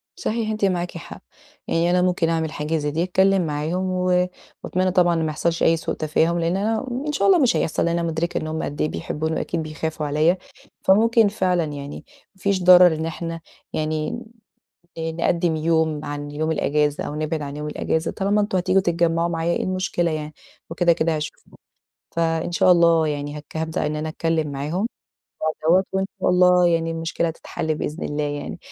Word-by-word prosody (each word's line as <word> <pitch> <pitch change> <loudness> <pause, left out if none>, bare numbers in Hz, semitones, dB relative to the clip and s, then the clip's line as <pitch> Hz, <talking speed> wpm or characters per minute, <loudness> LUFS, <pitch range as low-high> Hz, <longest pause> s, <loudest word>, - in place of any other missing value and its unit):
صحيح 220 -1 -2
أنتِ 215 -2 0
معاكِ 175 -2 -1
حق، 170 - -10 0.5
يعني 170 +1 +1
أنا 180 0 +3
ممكن 180 -2 +1
أعمل 160 -1 -1
حاجة 155 +2 -2
زَي 150 -1 -2
دي 160 +3 0
أتكلم 190 0 +3
معاهم، 160 +5 -2
و 180 0 +2 0.4
وأتمنى 185 0 0
طبعًا 175 -2 +3
ما 165 -1 0
يحصلش 165 +2 -1
أي 165 - +4
سوء - - -3
تفاهم 160 +2 +1
لإن 170 +3 0
أنا 220 +5 -1 0.2
إن - - 0
شاء 295 - +1
الله 380 -3 +6
مش 255 -5 +3
هيحصل 160 - 0
لأن 170 0 +1
أنا 170 - -1
مدركة 165 +2 -2
إن 155 - -3
هُم 160 0 -3
قد 145 - -4
إيه 155 - +1
بيحبوني 160 +1 -3
وأكيد 165 -2 -2
بيخافوا 155 0 -4
عليّا، 155 +5 +2 0.5
فممكن 225 +3 +5
فعلًا 185 -4 +1
يعني 145 -2 -6 0.3
ما 190 - -23
فيش 195 -2 +1
ضرر 180 -2 +8
إن 160 - -3
إحنا 165 +1 -5 0.3
يعني 155 0 -1 0.9
ن 160 0 -3
نقدم 170 -1 +1
يوم 160 -1 +1
عن 145 0 -5
يوم 155 +2 -2
الإجازة 150 -1 0
أو - - -5
نبعد 155 +1 -2
عن 140 0 -6
يوم 150 0 -5
الإجازة، 160 +2 -1
طالما 200 +2 +1
أنتم 205 -2 0
هتيجوا 185 +1 +3
تتجمعوا 170 -1 +1
معايا 165 0 -1
إيه - - -1
المشكلة 185 -2 -1
يعني؟ 155 -1 -4 0.4
وكده 175 0 +3
كده 165 -1 0
هاشوفكم، 150 0 -7 0.7
فإن 165 0 0
شاء 180 +1 +4
الله 170 -2 +5
يعني 145 0 -3
هاك 150 +2 -9
هابدأ 160 -1 -2
إن 150 +1 -2
أنا 155 +1 -3
أتكلم 160 -2 -1
معاهم 155 +10 -2 0.5
في 155 0 -3
الموضوع 180 +4 +5
دوّة - - -17
وإن 190 0 0
شاء - - +2
الله 180 0 +5
يعني 165 -1 +1
المشكلة 165 0 -1
تتحل 160 -1 -4
بإذن 155 +2 -4
الله 150 0 -2
يعني، 145 0 -4
165 Hz, 190 wpm, -22 LUFS, 155-180 Hz, 0.9 s, ضرر